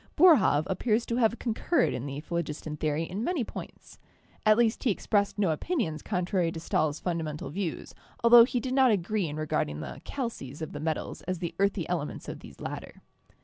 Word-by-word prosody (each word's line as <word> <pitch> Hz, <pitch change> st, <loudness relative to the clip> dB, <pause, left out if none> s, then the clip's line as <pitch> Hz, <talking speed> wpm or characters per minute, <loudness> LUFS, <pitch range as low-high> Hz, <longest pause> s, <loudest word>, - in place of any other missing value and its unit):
Boerhaave 280 Hz, -, +6 dB
appears 220 Hz, +4 st, +1 dB
to 235 Hz, -, -2 dB
have 230 Hz, -1 st, +3 dB
concurred 240 Hz, -, +1 dB
in 125 Hz, +2 st, -4 dB
the 140 Hz, +1 st, -5 dB
phlogiston 155 Hz, -2 st, -4 dB
theory 150 Hz, +1 st, -1 dB
in 190 Hz, +6 st, -4 dB
many 330 Hz, -3 st, 0 dB
points. -, -, -10 dB, 0.5 s
At 215 Hz, 0 st, +6 dB
least 235 Hz, -1 st, +2 dB
he 260 Hz, -, +3 dB
expressed 205 Hz, 0 st, +1 dB
no 195 Hz, -5 st, +2 dB
opinions 160 Hz, -, -1 dB
contrary 180 Hz, -1 st, 0 dB
to 165 Hz, -, -5 dB
Stahl's 155 Hz, -2 st, 0 dB
fundamental 160 Hz, -5 st, -3 dB
views, 175 Hz, -1 st, -4 dB, 0.3 s
altho 235 Hz, 0 st, +9 dB
he 245 Hz, +1 st, 0 dB
did 255 Hz, +2 st, -3 dB
not 265 Hz, -1 st, +5 dB
agree 205 Hz, -2 st, +1 dB
in 150 Hz, -, -5 dB
regarding 145 Hz, -, -1 dB
the 75 Hz, -, -7 dB
'calces' 165 Hz, -, -5 dB
of 155 Hz, -, -5 dB
the 145 Hz, -, -6 dB
metals 155 Hz, 0 st, -3 dB
as 185 Hz, 0 st, -1 dB
the 170 Hz, 0 st, -4 dB
earthy 200 Hz, -3 st, +1 dB
elements 165 Hz, -5 st, -3 dB
of -, -, -6 dB
these -, -, -13 dB
latter. -, -, -7 dB
180 Hz, 190 wpm, -28 LUFS, 155-230 Hz, 0.5 s, altho